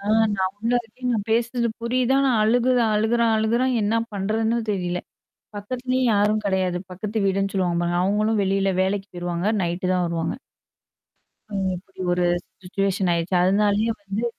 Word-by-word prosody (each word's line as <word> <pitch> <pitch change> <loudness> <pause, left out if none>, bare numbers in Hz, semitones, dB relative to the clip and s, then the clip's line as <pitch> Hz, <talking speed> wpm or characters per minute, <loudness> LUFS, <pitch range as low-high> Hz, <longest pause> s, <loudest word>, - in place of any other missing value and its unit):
ஆ 200 - -9 0.3
நான் 190 0 -1
உள்ள 230 +3 -1
இருக்கேன். 250 +3 -5
நான் 210 -3 -1
பேசுறது 235 +1 +1
புரியுது, 250 +2 +1
ஆனா 275 -1 +3
அழுகுத 245 +3 +3
அழுகுறான் 225 +1 +2
அழுகுறான். 235 +4 +1
என்ன 205 +2 +1 0.2
பண்றதுன்னே 220 +4 0
தெரியல. 180 -3 -2 0.6
பக்கத்துலேயும் 255 +4 -1
யாரும் 210 +1 +2
கிடையாது. 185 -2 0
பக்கத்து 205 +3 -3
வீடுன்னு 195 0 0
சொல்லுவாங்க 175 -3 +1
பாருங்க. 175 0 0
அவங்களும் 210 +2 +1
வெளியில 195 0 +1
வேலைக்கு 195 +1 -1
போயிருவாங்க. 175 +1 -2
நைட்டு 175 +2 -2
தான் 180 -1 +1
வருவாங்க. 165 -1 -2 1.2
ம். 195 -2 -1
இப்டி 185 +1 -9
ஒரு 175 0 +1 0.4
சிச்சுவேஷன் 195 0 0
ஆயிடுச்சு. 170 +2 0
அதனாலேயே 205 +4 +2
வந்து 200 +4 -3
205 Hz, 145 wpm, -23 LUFS, 185-225 Hz, 1.2 s, ஆனா